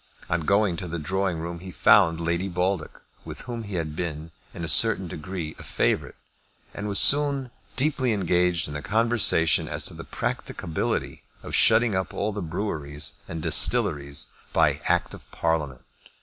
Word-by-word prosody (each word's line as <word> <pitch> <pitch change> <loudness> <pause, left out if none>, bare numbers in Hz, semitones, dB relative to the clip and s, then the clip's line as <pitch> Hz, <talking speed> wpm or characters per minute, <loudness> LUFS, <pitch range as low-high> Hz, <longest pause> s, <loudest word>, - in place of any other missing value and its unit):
On 80 +1 +1
going 100 +1 +2
to 90 - -5
the 85 +1 -4
drawing 95 +2 -1
room 85 +1 -5
he 95 +2 -9
found 90 -3 +4
Lady 85 +3 -1
Baldock, 90 -1 -2 0.2
with - - -8
whom 120 -2 -6
he 100 -2 -6
had 80 -3 -3
been, 80 -2 -5 0.2
to 85 - -7
a - - -3
certain 100 +3 +4
degree, 80 0 -6
a - - -9
favourite, - - -1 0.6
and 105 - -5
was 100 -1 0
soon 140 -3 +5 0.2
deeply 135 -2 +2
engaged 90 -3 +1
in 75 - -7
a 75 - -4
conversation 110 -7 +2
as - - -3
to - - -1
the - - -8
practicability 80 -2 -3 0.2
of - - -8
shutting 115 0 +5
up 95 0 -2
all 105 +2 -1
the 105 0 -5
breweries 80 -5 -3
and 80 -2 -6
distilleries 70 0 +1 0.2
by - - +2
Act - - +1
of - - -13
Parliament. 75 -6 -2
90 Hz, 165 wpm, -25 LUFS, 80-105 Hz, 0.6 s, soon